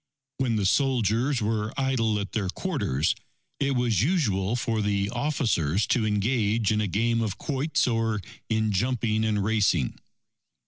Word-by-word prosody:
When 125 -4 0
the 105 -2 0
soldiers 125 +1 +1
were 105 0 -1
idle 120 -5 +1
at 100 0 -5
their 100 -4 -1
quarters, 70 -4 -1 0.5
it 140 -1 +1
was 120 -6 +1
usual 115 - +1
for 115 -2 -1
the 100 0 0
officers 105 - 0
to 115 -3 +2
engage 110 0 +1
in 105 0 +1
a 105 - 0
game 115 +5 +1
of 110 -3 -2
quoits 145 +2 0
or 115 -3 0 0.3
in 110 -1 +1
jumping 110 +1 0
and 105 -2 +1
racing. 100 - +1
110 Hz, 145 wpm, -26 LUFS, 105-125 Hz, 0.5 s, to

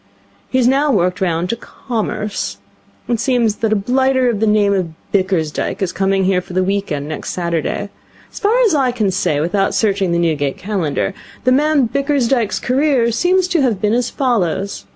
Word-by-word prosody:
He 260 - 0
has 250 -2 +3
now 280 +3 +3
worked 180 -5 +1
round 175 -1 0
to - - -1
Commerce. 220 -3 -4 0.5
It 235 -2 0
seems 235 -4 +1
that 225 -1 -1
a - - +4
blighter 260 +4 +2
of 220 -4 -1
the 220 - +1
name 210 -1 +3
of 180 -4 -1 0.2
Bickersdyke 185 -6 0
is 190 -3 -1
coming 195 0 +1
here 185 -1 +2
for 180 - -12
the 185 +1 +2
week 200 0 -1
end 145 -1 -3
next 155 -1 -5
Saturday. 170 +3 -2 0.4
As - - -9
far 435 +4 +2
as 445 -8 +3
I 270 -4 +2
can 215 -5 0
say 165 -6 0
without 185 +5 0
searching 195 -4 +1
the 170 - +1
Newgate 150 -5 0
Calendar, 190 -3 -2 0.3
the 255 - +3
man 290 -1 +3
Bickersdyke's 270 -4 0
career 260 -2 +2
seems 360 +9 +2
to 345 -4 +2
have 235 -7 +1
been 210 +1 +1
as 245 0 +1
follows. 200 - -1
210 Hz, 190 wpm, -17 LUFS, 185-255 Hz, 0.5 s, a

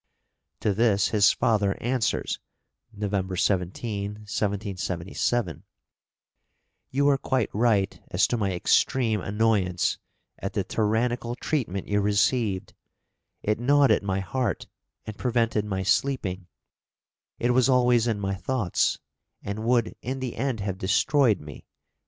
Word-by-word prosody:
To 105 - +1
this 105 -2 +2
his 105 -2 +5
father 100 -3 +1
answers 125 -1 -1 0.5
(November 100 -3 -2
17, 100 +2 -1
1777): 100 -1 -2 1.3
"You 140 +2 +1
are 140 -1 +3
quite 130 -6 0
right 105 -3 +1
as 90 - +3
to - - -1
my 100 -4 0
extreme 110 +4 +2
annoyance 100 -3 +1 0.4
at - - -4
the - - 0
tyrannical 120 +2 0
treatment 120 - -2
you 105 0 +1
received; 105 0 +1 0.7
it 105 +1 0
gnawed 140 +1 +4
at 105 - +3
my 95 -1 -1
heart, 125 +5 -2 0.4
and 110 - -6
prevented 115 -4 +1
my 95 -2 -2
sleeping; 95 -3 0 0.9
it 120 - +1
was 130 +1 +3
always 125 -2 +4
in 110 -3 0
my 100 -1 -1
thoughts, 105 -1 0 0.5
and 105 +3 -4
would 120 -2 +2
in 130 +3 -4
the 130 -2 -4
end 125 -3 -2
have 95 -2 -3
destroyed 120 +3 +3
me. 75 -2 -11
105 Hz, 125 wpm, -26 LUFS, 100-120 Hz, 1.3 s, his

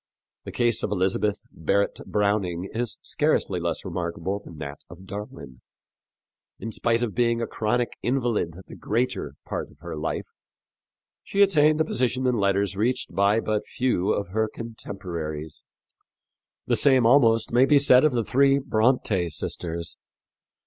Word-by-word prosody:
The - - -6
case 120 -2 +1
of - - -1
Elizabeth 100 +2 0
Barrett 100 +6 0
Browning 100 -4 0
is 115 -1 -2
scarcely 145 - 0
less 85 +2 -3
remarkable 90 +2 -3
than 80 - -12
that 70 -2 -7
of 90 +2 -12
Darwin. 95 - -8 1.0
In 115 - -6
spite 115 +2 0
of 110 -4 -2
being 115 -1 +1
a 115 - -1
chronic 115 +2 -1
invalid 120 -10 0
the - - -11
greater 120 +4 -2
part - - -4
of - - -20
her 85 -1 -6
life, 75 +1 -3 1.0
she 200 0 +3
attained 155 -5 +4
a - - +2
position 130 -1 0
in 125 - +3
letters 100 0 +1
reached 115 +2 -1
by 100 +4 +3
but 110 -2 -1
few 110 -6 0
of 100 -2 -2
her 110 +3 0
contemporaries. 85 -9 -6 1.0
The - - +1
same 130 -4 +4
almost 115 -3 +4
may 125 +3 +5
be 145 - +6
said 130 -2 +6
of 155 - +4
the 120 -2 0
three 140 +3 +4
Brontë 110 - +1
sisters. 85 +2 -4
105 Hz, 150 wpm, -25 LUFS, 90-125 Hz, 1.0 s, be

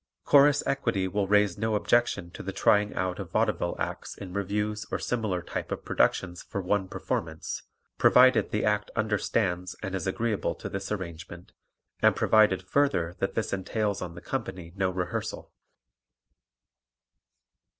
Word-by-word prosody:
Chorus 145 0 +5
Equity 95 -8 0
will 100 +1 -1
raise 105 -2 +3
no 110 0 0
objection 105 -4 +1
to - - -8
the 95 - -4
trying 105 +2 +2
out 90 0 -2
of - - -6
vaudeville - - 0
acts - - -4
in 95 -2 -8
revues 105 +2 -1
or - - 0
similar 105 -7 -2
type - - -5
of - - -4
productions 90 -1 +1
for - - -5
one 95 +1 0
performance, 80 -3 -4 0.4
provided 130 -1 +6
the 105 - -1
act 105 -1 +1
understands 100 -4 0
and 95 - -4
is 95 -2 -2
agreeable 110 +1 -1
to - - -7
this 95 +1 -5
arrangement 85 -3 -6 0.5
and - - +5
provided, 105 -4 +4
further, 115 -13 +1
that 95 - -1
this 110 - -1
entails 100 +2 -1
on 85 -2 -6
the 85 - -9
company 95 -10 -5
no 95 -1 +1
rehearsal. 90 -1 -4
100 Hz, 150 wpm, -28 LUFS, 90-110 Hz, 0.5 s, provided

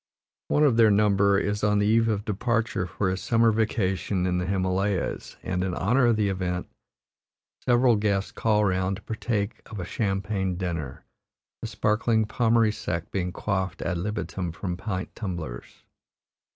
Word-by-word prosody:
One 150 - +2
of 135 -6 +4
their 115 -2 +6
number 100 -1 +4
is 105 +1 -1
on 105 0 +3
the 105 - +2
eve 115 +2 +3
of 105 -2 -1
departure 110 -2 -1
for 95 +2 -1
his 95 - -3
summer 115 -1 +3
vacation 100 -4 0
in 90 -1 +1
the 90 - -2
Himalayas 95 0 -1
and, 90 0 -1
in 90 -2 -2
honor 120 +6 +3
of 115 - +4
the 105 -1 +1
event, 90 -2 -2 1.0
several 120 -1 +4
guests 100 -2 0
call 105 -2 +2
round 95 0 0
to - - -11
partake 110 -1 -2
of 110 - -7
a 90 - -4
champagne 95 -1 -1
dinner, 85 -7 -4 0.6
the 115 - -3
sparkling 110 +1 +1
Pommery 115 0 +2
Sec 85 -5 -4
being 90 -2 -1
quaffed 95 0 -2
ad 90 -2 -1
libitum 95 -2 -3
from 90 +2 -4
pint 95 0 -4
tumblers. 85 - -6
100 Hz, 160 wpm, -26 LUFS, 95-110 Hz, 1.0 s, their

